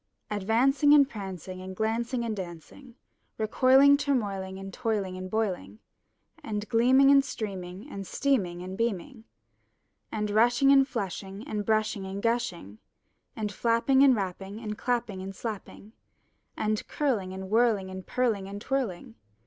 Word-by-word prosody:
Advancing 255 +8 +3
and 280 -2 +6
prancing 190 - -7
and 190 0 -7
glancing 235 +3 -1
and 220 -2 -2
dancing. 190 - -9 0.4
Recoiling, 265 +6 +5
turmoiling, 200 -10 -2
and 195 0 -8
toiling 210 -6 -2
and 185 0 -6
boiling. 185 - -2 0.7
And 210 -1 -4
gleaming 255 +4 +5
and 275 -1 +6
streaming 195 -4 -6
and 195 -9 -7
steaming 190 -11 0
and 185 +1 -6
beaming. 230 +2 -3 0.9
And 210 -1 -2
rushing 240 +5 +4
and 270 -1 +6
flushing 195 -2 -5
and 210 -1 -2
brushing 215 -2 0
and 195 +1 -5
gushing. 185 - -2 0.6
And 210 -2 -3
flapping 230 +5 +2
and 275 -2 +7
rapping 195 +1 -4
and 210 -2 -5
clapping 230 -5 -2
and 195 +1 -7
slapping. 215 0 -7 0.6
And 215 0 -1
curling 230 -11 -1
and 190 +1 -7
whirling 220 -5 +2
and 190 0 -7
purling 225 -6 0
and 200 +1 -6
twirling. 220 - -3
215 Hz, 140 wpm, -28 LUFS, 190-245 Hz, 0.9 s, and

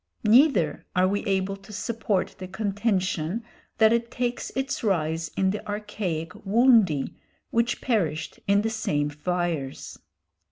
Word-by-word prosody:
Neither 225 - +4
are 185 +1 +4
we 205 +2 -1
able 195 -1 0
to 195 +2 -14
support 210 -2 -1
the 185 - -6
contention 195 -1 -1 0.3
that 220 0 +6
it 235 0 0
takes 245 0 -2
its 265 -1 -2
rise 165 -5 0
in 190 0 +3
the 210 - -4
archaic 205 -6 -3
"woundy," 210 - +4 0.4
which 235 +1 +1
perished 170 - -1
in 200 +1 +4
the 225 - 0
same 150 -10 -1
fires. 165 -3 -3
200 Hz, 130 wpm, -26 LUFS, 175-225 Hz, 0.4 s, that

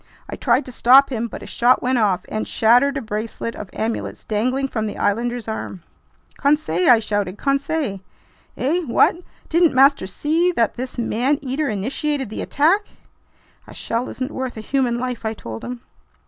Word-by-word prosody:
I - - -6
tried 255 +2 +1
to 255 - -8
stop 265 +4 +5
him, 235 -2 -2
but - - -9
his - - -9
shot 245 +2 +3
went 250 0 +1
off 190 -4 +1
and 215 - -3
shattered 245 +5 +3
a 275 - -4
bracelet 220 +2 -4
of 205 - -8
amulets 225 +1 -4
dangling 255 +6 0
from 220 -4 -3
the - - -6
islander's 235 +3 -1
arm. 195 -5 -5 0.6
"Conseil!" 280 - +2
I 245 - +8
shouted. 205 -3 -2
"Conseil!" 275 -5 -1 0.6
"Eh? 300 +8 +1
What? 235 - +3 0.3
Didn't 335 -3 +3
master 270 -6 +5
see 320 - +1
that 230 -8 +1
this 255 +1 -6
man 245 +4 +1
eater 275 +3 -1
initiated 265 +4 -2
the - - -4
attack?" 325 +8 +2 0.9
"A - - -12
shell 235 +3 -2
isn't 260 +2 -5
worth 260 -3 -4
a - - -5
human 250 0 0
life!" 250 -1 -4
I 220 0 -2
told 115 - -8
him. 245 -1 -6
245 Hz, 175 wpm, -21 LUFS, 220-275 Hz, 0.9 s, I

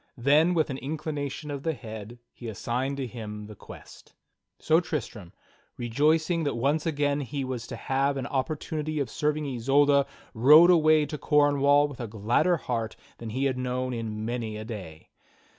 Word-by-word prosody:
Then, 150 +8 +4
with 155 -3 +1
an 135 - -5
inclination 150 0 -4
of 140 -1 -4
the 160 +1 -1
head, 110 0 -9 0.2
he 120 - -9
assigned 125 +5 -2
to 135 - -2
him 105 -3 -7
the 105 - -10
quest. - - -14 0.4
So 160 +1 +3
Tristram, 115 - -5 0.5
rejoicing 155 +8 +1
that 145 -5 -1
once 145 +6 0
again 145 -2 0
he 140 0 -4
was 125 -3 -5
to - - -6
have 135 +1 0
an 130 - -3
opportunity 155 +3 -3
of 130 -6 -2
serving 150 0 -1
Isolda, 140 +2 +3 0.3
rode 150 +9 +7
away 155 -3 +5
to 150 0 -6
Cornwall 145 -1 +4
with 145 -3 -11
a 120 - -4
gladder 115 - +1
heart 115 -6 -3 0.2
than 115 - -6
he 130 +5 -1
had 130 -2 0
known 125 0 -2
in 110 -2 -4
many 115 -2 -3
a 110 - -7
day. 95 -9 -9
135 Hz, 170 wpm, -27 LUFS, 115-150 Hz, 0.5 s, rode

